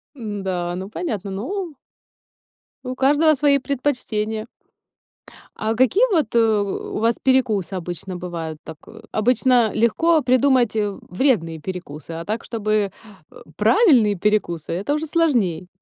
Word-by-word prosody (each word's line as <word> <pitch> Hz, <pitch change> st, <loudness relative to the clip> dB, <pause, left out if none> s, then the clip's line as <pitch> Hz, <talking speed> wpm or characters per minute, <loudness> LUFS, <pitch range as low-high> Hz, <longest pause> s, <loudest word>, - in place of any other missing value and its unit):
Н-да, 190 Hz, -7 st, -3 dB
ну 190 Hz, +2 st, -6 dB
понятно. 215 Hz, -, -4 dB
Ну 310 Hz, -, -4 dB, 1.1 s
у 255 Hz, 0 st, -5 dB
каждого 295 Hz, +4 st, +4 dB
свои 285 Hz, 0 st, +3 dB
предпочтения. 240 Hz, -6 st, -2 dB, 1.1 s
А 220 Hz, +1 st, -2 dB
какие 260 Hz, -, +4 dB
вот, 305 Hz, -, +1 dB
э, -, -, +5 dB
у 215 Hz, -3 st, 0 dB
у -, -, -1 dB
вас 230 Hz, +1 st, +2 dB
перекусы 225 Hz, -8 st, +1 dB
обычно 180 Hz, +1 st, -5 dB
бывают? 170 Hz, -3 st, -6 dB
Так, 160 Hz, -2 st, -9 dB
о 225 Hz, -, -13 dB
обычно 245 Hz, +1 st, +3 dB
легко 310 Hz, +9 st, +3 dB
придумать, 255 Hz, -2 st, +3 dB
э, 210 Hz, -1 st, +1 dB, 0.2 s
вредные 180 Hz, -, +1 dB
перекусы, 165 Hz, -3 st, -7 dB
а 165 Hz, +1 st, -5 dB
так, 220 Hz, +4 st, -3 dB
чтобы, 215 Hz, -3 st, -1 dB, 0.4 s
э, -, -, -18 dB, 0.2 s
правильные 230 Hz, -, +4 dB
перекусы 180 Hz, -5 st, -1 dB
это 200 Hz, +12 st, -1 dB
уже 310 Hz, +1 st, -2 dB
сложней. 235 Hz, -, +1 dB
220 Hz, 135 wpm, -21 LUFS, 190-265 Hz, 1.1 s, э